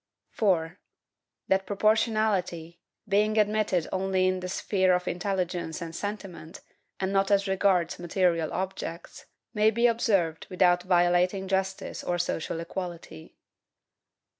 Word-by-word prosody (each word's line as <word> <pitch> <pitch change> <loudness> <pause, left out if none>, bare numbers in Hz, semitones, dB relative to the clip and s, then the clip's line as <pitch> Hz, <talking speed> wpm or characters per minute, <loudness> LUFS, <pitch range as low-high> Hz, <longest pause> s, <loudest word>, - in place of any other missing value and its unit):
4. 180 -4 0 0.7
That 190 0 +1
PROPORTIONALITY, 205 -5 0 0.3
being 210 +2 +2
admitted 210 -4 +1
only 190 0 +1
in 185 0 0
the 185 0 -5
sphere 185 -1 +1
of 180 0 -3
intelligence 180 -3 -2
and 165 -2 -7
sentiment, 195 -5 -6 0.4
and 190 0 -1
not 195 0 +2
as 200 0 +2
regards 190 -3 +1
material 175 -2 0
objects, 185 -2 -5 0.3
may 215 -1 +4
be 235 +2 +1
observed 200 -9 +1
without 180 -1 +3
violating 180 +1 +2
justice 190 0 -2
or 175 - -1
social 165 -1 -2
equality. 170 - -7
185 Hz, 115 wpm, -27 LUFS, 175-200 Hz, 0.7 s, may